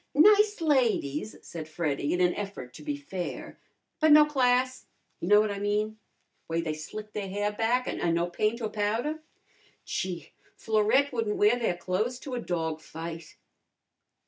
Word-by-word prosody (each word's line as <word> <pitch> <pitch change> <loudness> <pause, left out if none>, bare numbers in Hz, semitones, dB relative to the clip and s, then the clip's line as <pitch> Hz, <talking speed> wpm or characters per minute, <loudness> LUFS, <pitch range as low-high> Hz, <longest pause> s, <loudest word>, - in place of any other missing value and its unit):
"Nice 415 +4 +5
ladies," 230 - +1
said 160 -2 -7
Freddy 150 -3 -1
in 180 - +1
an 180 0 +4
effort 195 -12 -6
to - - -11
be 295 -1 -3
fair. 190 -12 -6 0.4
"But 315 -1 +4
no 300 0 +9
class 255 -3 +1 0.3
you 170 - -4
know 210 +2 +7
what 215 -1 +1
I 200 - -4
mean. 210 +1 -1 0.5
Way 165 0 0
they 155 -2 -2
slick 210 +8 -8
their 200 -2 -4
hair 205 +2 -1
back, 230 +4 0
an' 170 -1 0
no 170 +1 +1
paint 215 +6 -1
or 220 - -1
powder. 225 +10 -1 0.7
Gee, 180 -5 -4 0.2
Florette 220 +6 +2
wouldn't 225 -3 -1
wear 215 +4 +4
their 200 -7 0
clo'es 200 +8 -1
to 270 - -7
a 245 - -1
dog 160 -5 -2
fight!" 165 0 -8
210 Hz, 165 wpm, -28 LUFS, 175-250 Hz, 0.7 s, no